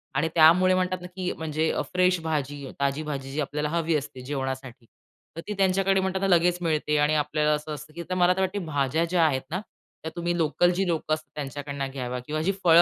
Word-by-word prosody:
आणि 150 +4 +2
त्यामुळे 175 +4 +6
म्हणतात 185 0 0
ना 180 - -7
की 185 -1 -2
म्हणजे 160 0 -1
अ, - - -1
फ्रेश 180 0 +3
भाजी 145 -3 -2
ताजी 140 +2 0
भाजी 135 -3 -5
जी 150 - -4
आपल्याला 150 +1 -2
हवी 165 0 0
असते 130 -3 -4
जेवणासाठी. 130 -3 -4 0.5
तर 165 - -5
ती 210 - -2
त्यांच्याकडे 195 0 +3
म्हणताना 190 +1 0
लगेच 175 0 +4
मिळते 155 -2 +1
आणि 150 +1 +2
आपल्याला 150 0 +1
असं 150 +1 -3
असतं 150 +1 -9
की 170 +1 -6
मला 180 0 +4
तर 190 - -5
वाटते 190 +2 0
भाज्या 145 +2 0
ज्या 170 -1 +2
आहेत 135 -4 +1
ना 185 - -1 0.4
त्या 160 - -4
तुम्ही 175 0 -1
लोकल 170 +2 +3
जी 195 -1 +1
लोकं 160 -2 0
असतात 155 -2 -4
त्यांच्याकडनं 140 -1 -4
घ्यावा 125 -2 -4
किंवा 155 +2 -2
जी 190 +5 +1
फळं 170 0 +8
155 Hz, 210 wpm, -26 LUFS, 145-180 Hz, 0.5 s, फळं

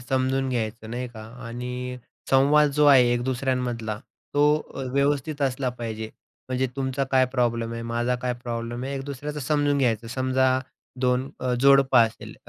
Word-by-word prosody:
समजून 130 +1 0
घ्यायचं 110 -2 -3
नाही 125 +1 -4
का. 115 -2 -11 0.3
आणि 125 +1 -5 0.3
संवाद 145 +2 +5
जो 150 +1 +3
आहे 125 -4 +6
एक 120 - 0
दुसऱ्यांमधला, 125 -4 -2 0.4
तो 145 0 +4 0.3
अ, 135 - -4
व्यवस्थित 140 +1 0
असला 130 -1 0
पाहिजे. 110 -2 -5 0.4
म्हणजे 130 +1 0
तुमचा 135 0 -1
काय 130 -1 +5
प्रॉब्लेम 115 -3 0
आहे, 115 0 -5
माझा 120 +2 -1
काय 125 0 0
प्रॉब्लेम 120 0 -4
आहे, 135 +1 -3
एक 135 -1 -4
दुसऱ्याचं 145 +2 -5
समजून 145 +1 +1
घ्यायचं. 115 -4 +1
समजा 130 +1 +1 0.4
2 125 +1 +1
अ, 125 0 0
जोडप 135 -1 +5
असेल, 115 -1 +2
130 Hz, 160 wpm, -25 LUFS, 120-135 Hz, 0.4 s, आहे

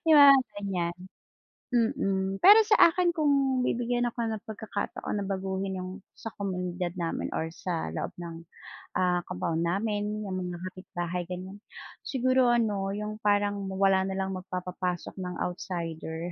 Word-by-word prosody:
'Di 320 - +6
ba, 285 -1 +10 0.3
ganiyan? 180 -4 -2 0.8
Mm. 195 -6 +1
Pero 415 +4 +9
sa 380 -6 +7
akin 350 -1 +1
kung 275 -4 +2
bibigyan 245 0 0
ako 235 -1 -1
ng 220 -1 -4
pagkakataon 215 -2 -4
na - - -3
baguhin 190 0 -2
'yung 185 0 -5 0.2
sa 225 - -7
komunidad 180 -3 -2
namin 165 -1 -2
or 160 - -1
sa 170 - -3
loob - - -3
ng, 165 -1 -7 0.5
ah, 180 -1 +2
compound 160 - -2
namin, 210 +2 -1
'yung 195 - -5
mga 180 -1 -3
kapitbahay 180 -2 -4
ganiyan, 185 +2 -7 0.5
siguro 255 -1 +3
ano 205 -5 +1
'yung 210 +1 -4
parang 205 -1 +1
wala 190 0 +3
na 190 - -3
lang 190 0 -1
magpapapasok 180 -1 -4
ng 180 -1 -4
outsider. 170 -1 -4
195 Hz, 145 wpm, -28 LUFS, 180-225 Hz, 0.8 s, ba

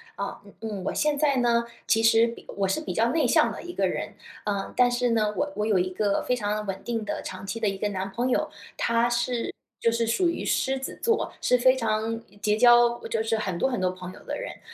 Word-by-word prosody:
啊， - - -5
嗯 200 - -15
嗯， 210 -4 -4
我 - - -1
现 300 -1 +1
在 285 -2 +2
呢， 235 -1 +3 0.2
其 225 - +3
实 225 0 +5
比 235 0 -6
我 195 - +1
是 190 +11 0
比 - - -4
较 230 +1 +2
内 325 - +2
向 - - +4
的 - - -7
一 350 - -7
个 - - +1
人， - - -4 0.3
呃， 200 -2 -2
但 250 0 +5
是 245 0 +1
呢， 215 -2 +2
我 290 0 -1
我 210 - -1
有 215 -3 +3
一 185 0 0
个 200 +1 0
非 250 - +1
常 210 -2 -2
稳 195 -1 -5
定 230 -3 -2
的 - - -3
长 185 +1 -7
期 195 +4 -4
的 215 -2 +1
一 195 - -4
个 205 +2 -1
男 195 -1 -4
朋 245 +5 -1
友， - - +1 0.3
他 235 +1 +2
是 240 0 -1 0.2
就 230 - +3
是 230 0 +1
属 290 +11 +2
于 340 - -3
狮 270 0 +1
子 265 - -6
座， 455 -2 +1
是 250 - +3
非 255 +1 +5
常 225 -2 -1 0.2
结 210 0 +2
交 240 0 +6
就 220 -1 -1
是 225 0 0
很 190 -5 -2
多 265 - +1
很 245 - -2
多 185 -1 +1
朋 185 0 -8
友 - - -14
的 - - -3
人， - - -5
呃， - - -14
230 Hz, 275 characters per minute, -26 LUFS, 205-245 Hz, 0.3 s, 交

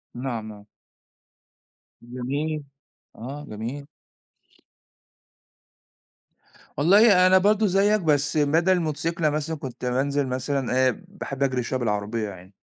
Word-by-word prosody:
نعم، 120 -3 -4
نعم. 105 -1 -11 1.4
جميل، 140 +6 -4 0.5
آه 140 +6 -8
جميل. 120 +7 -6 2.9
والله 185 +3 +6
أنا 185 - +6
برضو 210 +3 +3
زيك، 200 +3 +2
بس 145 -2 +1
بدل 160 +5 +3
الموتوسيكل 165 -1 -1
مثلًا 155 +2 -2
كنت 130 -3 -7
بانزل 135 +2 0
مثلًا، 130 0 0
آآ - - +3 0.2
باحب 140 -8 -5
أجري 130 -3 0
شوية 130 +2 -2
بالعربية 105 -1 -2
يعني. 95 0 -13
140 Hz, 105 wpm, -24 LUFS, 125-165 Hz, 2.9 s, والله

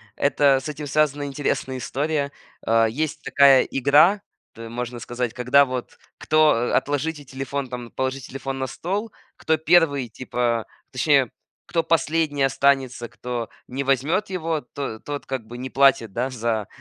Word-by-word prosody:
это 140 -1 +3
с 150 - -5
этим 150 0 -6
связана 145 0 +1
интересная 135 -2 -2
история. 140 +3 -2 0.3
А, 115 0 +4
есть 150 +6 -3
такая 140 -2 +6
игра, 150 +9 +4 0.3
т 115 0 -9
можно 120 0 -5
сказать, 120 0 -3
когда 130 +3 +4
вот 130 -2 -6 0.2
кто 155 0 +4
э, 120 +1 -1
"отложите 145 +1 -1
телефон", 135 0 -5
там, 120 -2 -7
"положи 130 +1 -2
телефон 135 +1 -6
на 130 - -2
стол"- 205 - -4 0.3
кто 160 0 +1
первый, 155 -6 +3
типа, 120 -1 -2 0.3
точнее, - - +3 0.4
кто 165 -1 0
последний 160 -3 +1
останется, 135 -3 +1
кто 120 -1 -5 0.2
не 135 +2 -4
возьмет 150 - +1
его, 165 -4 -2 0.2
то 115 -6 -4
тот 145 -1 -6
как 130 -5 -5
бы 120 +1 -9
не 130 +1 -5
платит, 135 -6 +3
да, 125 +6 -2
за 115 -4 -2
135 Hz, 155 wpm, -23 LUFS, 125-150 Hz, 0.4 s, такая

